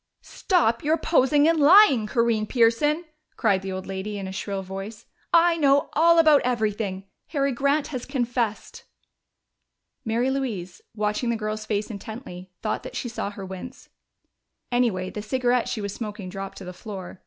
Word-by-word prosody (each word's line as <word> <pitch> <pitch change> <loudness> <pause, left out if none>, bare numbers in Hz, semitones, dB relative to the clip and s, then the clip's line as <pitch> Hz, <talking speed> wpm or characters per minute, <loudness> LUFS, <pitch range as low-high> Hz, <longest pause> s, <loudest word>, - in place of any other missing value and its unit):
"Stop 275 - +1
your 310 +2 +2
posing 295 -2 +3
and 330 -1 +3
lying, 290 - +6
Corinne 230 -2 +1
Pearson!" 275 +8 +2 0.3
cried 200 -5 +2
the 195 0 -5
old 185 0 -5
lady 195 +2 -5
in 195 -1 -5
a - - -6
shrill 195 0 -4
voice. 195 +4 -8 0.3
"I 340 0 +5
know 285 0 +3
all 335 +2 +5
about 310 -3 +6
everything. 215 -5 -1 0.2
Harry 280 -3 0
Grant 280 +4 0
has 255 -4 -5
confessed." 245 -5 -2 1.2
Mary 235 +4 0
Louise, 215 -10 -4
watching 210 +3 -1
the 235 - +1
girl's 215 0 -4
face 210 +1 -2
intently, 200 -3 -8
thought 215 - -1
that - - -9
she 245 - -3
saw 220 - -4
her 200 -1 -8
wince. 190 +8 -9 0.8
Anyway, 220 -7 0
the 210 - -5
cigarette 245 +2 0
she 220 - -3
was 200 -1 -4
smoking 210 -4 -6
dropped 195 0 -7
to 195 - -9
the 180 - -7
floor. 190 -1 -8
225 Hz, 165 wpm, -24 LUFS, 200-275 Hz, 1.2 s, lying